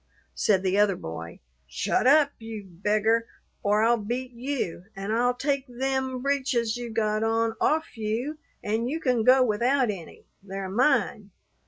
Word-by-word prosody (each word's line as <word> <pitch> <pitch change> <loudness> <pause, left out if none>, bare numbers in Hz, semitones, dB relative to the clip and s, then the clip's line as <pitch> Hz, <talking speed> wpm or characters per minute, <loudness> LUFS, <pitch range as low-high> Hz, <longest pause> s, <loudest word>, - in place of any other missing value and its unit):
Said 195 -3 +2
the 190 +1 +2
other 205 -2 +4
boy, 85 - -8 0.3
"Shut 65 - 0
up, 285 +1 +6
you 225 -2 -7
beggar, 215 +5 +1 0.3
or 210 +1 +2
I'll 235 +1 +3
beat 245 +4 -4
you; 240 -8 -4
an' 195 +2 -4
I'll 245 +2 +2
take 275 +1 -1
them 260 0 -2
breeches 260 -5 0
you 240 -1 -5
got 215 -1 0
on 225 0 +1
off 315 -2 +1
you, 235 +8 -2 0.2
an' 220 +3 -1
you 310 +5 -2
can 250 -7 +1
go 255 +2 +6
without 245 +2 +2
any 175 -5 -10 0.2
they're 195 0 -6
mine. 220 -2 +1
230 Hz, 155 wpm, -26 LUFS, 210-255 Hz, 0.3 s, up